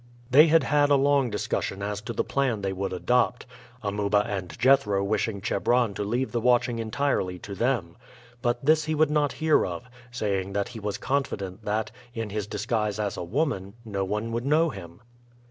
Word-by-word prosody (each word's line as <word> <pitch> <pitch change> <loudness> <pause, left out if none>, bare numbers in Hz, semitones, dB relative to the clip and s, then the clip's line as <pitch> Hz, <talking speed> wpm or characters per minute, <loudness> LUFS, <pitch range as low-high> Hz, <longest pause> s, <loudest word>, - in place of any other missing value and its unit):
They 150 +5 +8
had 165 +1 +5
had 145 -1 +3
a 145 - +6
long 140 -2 +3
discussion 100 -1 -2
as 105 0 -3
to 115 +2 -5
the - - 0
plan 125 -7 -1
they 95 -1 -1
would 95 +1 -3
adopt, 120 +7 +1 0.4
Amuba 105 0 +1
and 90 -5 -5
Jethro 115 -6 +3
wishing 105 0 -1
Chebron 120 +2 +1
to 105 - -3
leave 120 +6 -1
the 120 - -1
watching 120 -1 +2
entirely 110 -5 -1
to 100 +2 -8
them. 100 -5 -1 0.5
But 120 +1 -1
this 155 +1 +4
he 155 0 -1
would 155 0 +3
not 150 -2 +1
hear 160 -1 +3
of, 85 -2 -4 0.3
saying 100 -5 -2
that 100 0 -1
he 115 - -8
was 105 -1 -3
confident 100 -8 -3
that, 110 +1 -1 0.2
in 115 -3 -4
his 105 -1 -3
disguise 105 0 -1
as 105 -2 -1
a - - -4
woman, 100 - -2
no 100 -3 -2
one 105 +4 -2
would 115 +1 -2
know 155 +2 +3
him. 85 -1 -11
110 Hz, 190 wpm, -26 LUFS, 100-130 Hz, 0.5 s, They